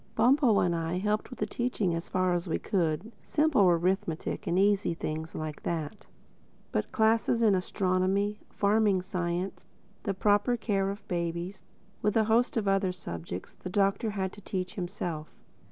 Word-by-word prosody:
Bumpo 245 -1 +4
and 175 - +2
I 165 +1 -1
helped 210 +3 0
with 250 - -9
the 210 - 0
teaching 215 -5 -1
as 165 +1 -4
far 185 -1 +1
as 175 +1 -1
we 160 - 0
could—simple 215 - 0
arithmetic, 175 0 0
and 175 - +1
easy 200 -2 +3
things 160 0 -4
like 155 -1 -5
that. 160 -4 -4 0.6
But 105 - 0
the - - -30
classes 225 +1 +3
in 215 -3 +5
astronomy, 190 +2 +1
farming 205 -2 +2
science, 180 0 -3 0.3
the 195 - -2
proper 205 +5 +3
care 200 -3 0
of 200 +1 -7
babies, 170 +2 -3 0.4
with 210 +1 +2
a 220 - +5
host 230 +3 +2
of 210 -3 0
other 195 -1 +2
subjects, 90 - -7
the 185 - -8
Doctor 200 +3 +1
had 195 -2 -2
to 205 - -12
teach 185 -2 -3
himself. 175 -4 -5
195 Hz, 160 wpm, -29 LUFS, 175-210 Hz, 0.6 s, in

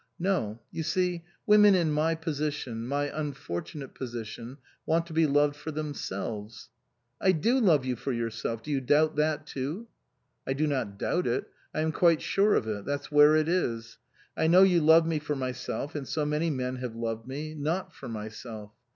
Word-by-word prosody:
"No. 170 - -1
You - - -4
see, 175 +1 -1 0.2
women 210 -1 +7
in 170 -4 +2
my 155 +2 +1
position, 150 -7 -3
my 140 +2 0
unfortunate 140 - -5
position, 120 0 -7 0.3
want 165 +1 +1
to 170 - -10
be 160 0 +4
loved 145 0 +3
for 145 - -7
them 150 -1 -3
selves." 105 -1 -6 0.3
" 120 0 -39
I 190 - +4
do 230 - +2
love 160 - +4
you 130 -1 -1
for 135 - -4
yourself. 115 -1 -3
Do 150 - -5
you 140 -2 +1
doubt 150 +4 +3
that 155 0 +1
too? 155 - -5
" - - -49
" - - -42
I 135 - +1
do 150 +3 0
not 130 -9 -2
doubt 175 - 0
it. 120 - -1 0.2
I 155 - -2
am 160 0 +1
quite 165 -1 +3
sure 205 +2 +3
of 110 - 0
it. 105 -2 -3
That's 145 +3 -4
where 150 +1 +7
it 155 0 +2
is. 115 -11 -1 0.4
I 160 - +1
know 180 +3 +7
you 180 -3 +4
love 160 +2 +6
me 165 -2 0
for 150 0 -3
my 130 -2 -2
self, 125 +3 -5
and 145 -3 -5
so 155 -2 -1
many 150 +3 0
men 130 -3 -2
have 125 -2 -5
loved 115 0 -4
me 150 +4 -5
not 155 +5 -2
for - - -9
myself. 110 -1 -7
145 Hz, 205 wpm, -28 LUFS, 120-160 Hz, 0.4 s, women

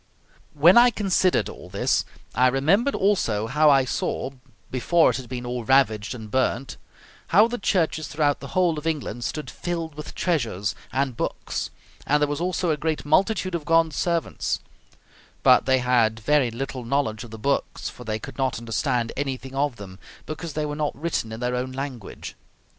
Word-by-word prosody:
When 170 +9 +7
I 245 +1 +7
considered 190 -5 +1
all - - -10
this - - +1 0.3
I 125 +2 +4
remembered 160 - +2
also 150 - +1
how 150 +6 +4
I 135 -2 +5
saw, 130 +1 -2 0.4
before 160 +6 +3
it - - -3
had 130 -2 -8
been 125 -1 -5
all 120 0 -3
ravaged 110 -4 +2
and 110 -3 -9
burnt, 130 +1 0 0.5
how 210 +6 +6
the 245 +1 -4
churches 160 -5 0
throughout 145 -2 +1
the 140 +5 -7
whole 175 -4 +3
of 155 - -6
England 125 -7 -2
stood 150 - -4
filled 165 -2 -4
with 150 +1 -9
treasures 110 - -1 0.2
and 135 -2 0
books, - - -3 0.4
and 150 +1 +3
there 150 - +2
was 145 +2 -3
also 180 -1 0
a 150 - 0
great 155 0 -2
multitude 185 +4 +2
of 170 -3 -2
God's 165 0 +3
servants; 170 -2 -1 0.8
but - - +6
they 130 0 +5
had 120 -3 +2
very 140 +2 +2
little 130 +2 -5
knowledge 115 -3 -1
of 120 - -10
the 110 - -8
books, 140 +6 -1
for 125 - -8
they 110 -2 -2
could 110 - -10
not 130 -1 0
understand 115 +1 -1
anything 135 -1 -4
of 140 -1 0
them, 95 -3 -10 0.3
because 155 +1 -6
they 150 +1 -1
were 145 0 -3
not 150 -2 -2
written 155 -8 -2
in 110 +2 -7
their 125 0 0
own 125 +1 -2
language. 130 -5 -6
140 Hz, 180 wpm, -24 LUFS, 125-160 Hz, 0.8 s, When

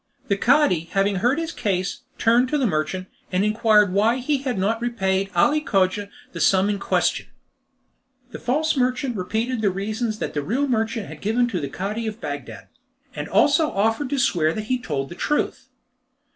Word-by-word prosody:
The 200 - +3
Cadi 235 - +3
having 195 0 +2
heard 245 +9 +2
his 330 0 -2
case, 190 -4 -2 0.2
turned 240 +3 +3
to 300 - +1
the 270 - +1
merchant, 180 0 -1 0.2
and 185 +2 +1
inquired 210 -2 +3
why 220 +5 +3
he 270 +3 0
had 260 -5 -3
not 220 +5 0
repaid 195 -5 0
Ali 295 - +3
Cogia 200 -5 0 0.2
the - - -7
sum 195 +2 +3
in 200 - -3
question. - - 0 1.0
The - - -7
false 305 +6 0
merchant 255 -1 0
repeated 220 +5 -2
the 205 - +3
reasons 215 +4 -3
that - - -4
the 145 - -1
real 250 - 0
merchant 225 -3 -1
had - - -10
given 235 +4 +1
to 190 -6 -2
the 140 - -4
Cadi 210 +8 -4
of 215 +1 -5
Bagdad, - - -7 0.5
and - - -5
also 320 -2 +4
offered 225 +7 0
to 285 - -1
swear 165 -10 +2
that 215 - -3
he 255 - +3
had 250 - -14
told 135 -3 -2
the - - -7
truth. 295 +2 -2
220 Hz, 185 wpm, -23 LUFS, 195-250 Hz, 1.0 s, also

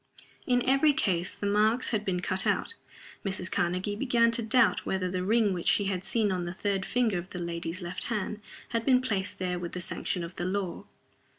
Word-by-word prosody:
In 245 -2 +2
every 275 +3 +5
case 180 -8 0
the - - -5
marks 215 +4 +3
had 215 -2 0
been 180 -3 -1
cut 185 +1 0
out. - - +1 0.5
Mrs. 190 -2 -2
Karnegie 185 +4 0
began 235 -1 +3
to 235 +1 0
doubt 235 +1 +3
whether 185 -1 -1
the 185 0 -1
ring 215 0 +3
which 175 -2 -4
she 205 - +3
had 190 -2 -1
seen 215 -2 +1
on 180 -2 -1
the 175 - -4
third 195 -1 -1
finger 225 -7 +1
of 180 +2 -9
the - - -7
lady's 170 +1 -4
left 175 +1 -3
hand 215 -2 -3 0.3
had 230 -1 -1
been 255 +1 +5
placed 200 -6 -2
there 180 -1 -2
with 175 -1 -6
the 180 - -3
sanction 180 -1 -3
of 170 +2 -8
the 175 - -2
law. 185 -2 -3
195 Hz, 210 wpm, -29 LUFS, 180-225 Hz, 0.5 s, every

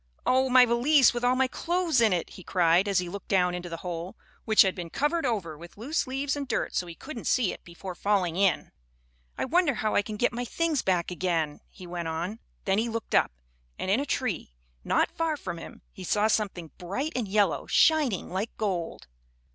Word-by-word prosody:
"Oh, 260 +1 +3
my 250 0 +7
valise, 250 +4 +4
with 240 0 -4
all 250 +1 +3
my 265 +1 +3
clothes 340 -1 0
in 225 -2 +4
it!" 175 -3 -1
he - - -11
cried, 175 +2 +3
as 200 -2 +1
he 180 - +1
looked 195 +2 -7
down 180 -2 +2
into 180 0 -5
the 165 - -5
hole, 175 +1 -5 0.3
which 220 -1 +6
had 190 -1 +1
been 175 -2 -6
covered 295 - 0
over 190 -10 -2
with 170 +5 -13
loose 280 +7 -1
leaves 270 +2 -1
and 285 -1 -4
dirt - - -1
so 180 - -1
he 170 - -8
couldn't 270 - -7
see 240 -7 +2
it - - -12
before 180 +2 -8
falling 185 -3 0
in. 195 -1 +1 0.7
"I - - -1
wonder 305 0 +2
how 215 -1 -1
I - - +4
can 210 +1 -6
get 245 - +1
my 245 +1 -3
things 315 +4 0
back 180 -2 0
again?" 170 -4 -1
he 185 - -12
went 175 -1 -4
on. 175 +7 -3 0.3
Then 195 +1 +2
he 230 +1 0
looked 230 0 -5
up, - - +4 0.5
and 190 - -2
in 215 - +3
a 285 - -1
tree, 210 - -2 0.3
not - - +1
far 325 -2 -1
from 175 -9 -6
him, - - -11
he 190 - -9
saw 205 +4 +1
something 190 -7 -1
bright 260 - -3
and 245 -4 -1
yellow, 205 +1 +1
shining 295 - +3
like 195 +5 -2
gold. 180 - -3
205 Hz, 215 wpm, -27 LUFS, 180-255 Hz, 0.7 s, my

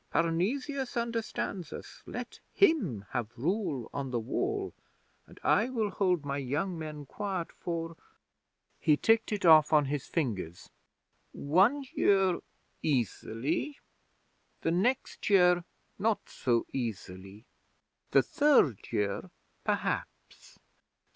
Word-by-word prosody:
Parnesius 245 - 0
understands 225 -7 -3
us. - - -9
Let - - -6 0.2
him 200 - +3
have 120 -2 -3
rule 150 - -1
on 140 -2 -3
the 120 -2 -1
Wall, 385 - -2 0.5
and - - -16
I 235 - +3
will 220 -5 -1
hold 180 -6 +1
my 140 0 -2
young 145 +8 -2
men 155 -2 -6
quiet 190 +2 -4
for" 165 -1 -4 0.8
he 150 -1 +4
ticked 225 +5 +3
it 205 -3 -1
off 155 -2 +7
on 150 -2 +5
his 140 0 -3
fingers 100 - -3 0.6
"one 195 - +3
year 190 -3 +3 0.4
easily: 140 - -1 0.8
the 165 - +1
next 215 +10 0
year 180 -3 +5 0.4
not 220 +1 0
so 120 -2 0
easily: 100 -4 -5 0.6
the - - +5
third 275 - +4
year, 105 -3 -1 0.3
perhaps! - - -3
165 Hz, 110 wpm, -30 LUFS, 130-215 Hz, 0.8 s, off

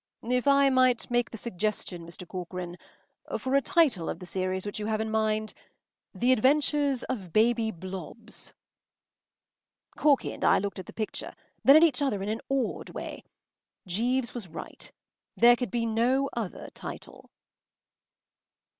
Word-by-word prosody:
“If 250 +3 0
I 280 -1 +5
might 255 -2 +3
make 240 0 +2
the 225 - -8
suggestion, 200 -5 -3
Mr. 170 +1 -7
Corcoran—for 180 +8 -7
a 275 - +5
title 280 - +2
of - - -3
the 180 - -10
series 185 +1 -2
which 205 +1 -4
you 210 - -3
have 215 -1 0
in 220 0 -2
mind—‘The 215 +3 -2
Adventures 280 +1 +3
of 200 -10 -5
Baby 230 +2 +3
Blobbs.’” 190 +4 -7 1.4
Corky 290 -3 +2
and - - -8
I - - +5
looked 200 0 -3
at 185 - -8
the - - -8
picture, 215 -2 -4 0.3
then 275 - +8
at 315 - +8
each 300 -5 +3
other 210 -9 0
in 200 - -3
an 220 +1 -2
awed 270 -4 -1
way. - - -7 0.6
Jeeves 235 +7 0
was 235 -6 -5
right. 165 - -9 0.5
There 240 +1 +7
could 250 0 -3
be 235 -1 -1
no 245 +5 +1
other 225 -6 -5
title. - - -9
225 Hz, 145 wpm, -28 LUFS, 195-255 Hz, 1.4 s, then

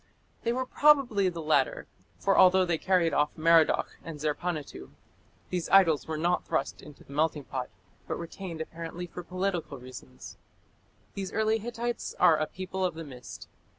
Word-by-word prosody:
They 235 - 0
were 255 +2 -1
probably 250 -10 +4
the 170 -2 -6
latter, 155 - +1 0.3
for 195 - +1
although 185 0 +6
they 170 -3 0
carried 180 -4 +2
off 150 +1 +3
Merodach 165 0 +3
and 165 -2 -7
Zerpanituᵐ, 155 +1 -3 0.6
these 180 -2 -2
idols 175 -6 +5
were 160 -1 -3
not 175 +3 +1
thrust 135 - -2
into 150 -1 -14
the 140 - -13
melting 150 0 0
pot, 130 -1 -5 0.4
but - - -3
retained 170 -1 -7
apparently 165 +2 -6
for 175 +1 -8
political 180 -4 -3
reasons. 130 0 -11 0.8
These 195 -2 -5
early 220 0 +2
Hittites 240 +1 -4
are 160 - +6
"a 155 - -1
people 190 +2 -5
of 180 -3 0
the 165 - -6
mist". 130 -5 -10
170 Hz, 160 wpm, -28 LUFS, 155-190 Hz, 0.8 s, although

